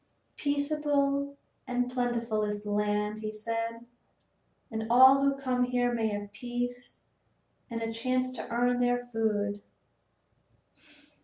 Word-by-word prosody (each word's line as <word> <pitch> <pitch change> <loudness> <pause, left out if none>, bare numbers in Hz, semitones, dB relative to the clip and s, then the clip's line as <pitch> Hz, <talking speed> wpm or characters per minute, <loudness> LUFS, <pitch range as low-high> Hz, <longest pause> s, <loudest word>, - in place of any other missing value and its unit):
"Peaceable 285 -1 0 0.3
and 245 0 0
plentiful 240 -3 0
is 210 0 -2
the 210 - -4
land," 210 +1 0
he 215 0 -4
said, 230 +2 -4 0.9
"and 220 0 -3
all 260 +3 +8
who 275 0 +3
come 255 -2 0
here 245 -1 +1
may 225 -2 +1
have 205 -1 -4
peace 245 +3 -5 0.7
and 230 -1 -3
a 225 0 -3
chance 255 +2 0
to 255 - -6
earn 245 +1 +2
their 245 0 +1
food. 205 -2 0
245 Hz, 125 wpm, -29 LUFS, 220-255 Hz, 0.9 s, all